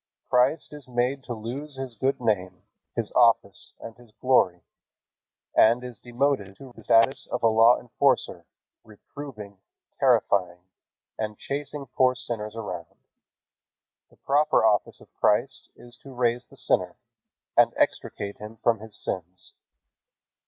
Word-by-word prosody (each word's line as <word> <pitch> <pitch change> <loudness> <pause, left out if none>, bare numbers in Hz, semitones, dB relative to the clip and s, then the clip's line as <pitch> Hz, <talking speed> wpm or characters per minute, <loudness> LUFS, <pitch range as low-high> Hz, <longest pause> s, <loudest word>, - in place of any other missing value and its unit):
Christ 130 +6 +2
is 145 -3 -10
made 125 +2 -1
to 120 - -4
lose 130 +7 -6
His 130 -2 -6
good 130 +5 -1
name, 105 -6 -1 0.3
His 115 -3 -2
office, 115 -5 +2
and 115 - -9
His 120 -2 -18
glory, 95 -9 +2 0.9
and 120 +3 +5
is 125 -3 -8
demoted 120 -5 -1
to 130 0 -13
the 115 - -14
status 130 +6 +3
of - - -4
a - - +6
law 115 +2 +5
enforcer, 120 -8 0 0.4
reproving, 105 -2 -11 0.4
terrifying, 90 -3 +2 0.6
and 105 -1 -3
chasing 140 0 -5
poor 130 -1 +2
sinners 115 -4 -5
around. 90 -7 -7 1.1
The - - -25
proper 145 -4 +2
office 105 -2 +1
of - - -19
Christ - - 0
is 120 0 -13
to 135 - -14
raise 120 0 0
the - - -18
sinner, - - 0 0.6
and - - +6
extricate 100 0 -1
him 105 +1 -9
from 115 -1 +1
his 110 -1 -9
sins. 90 0 -5
120 Hz, 135 wpm, -26 LUFS, 105-130 Hz, 1.1 s, a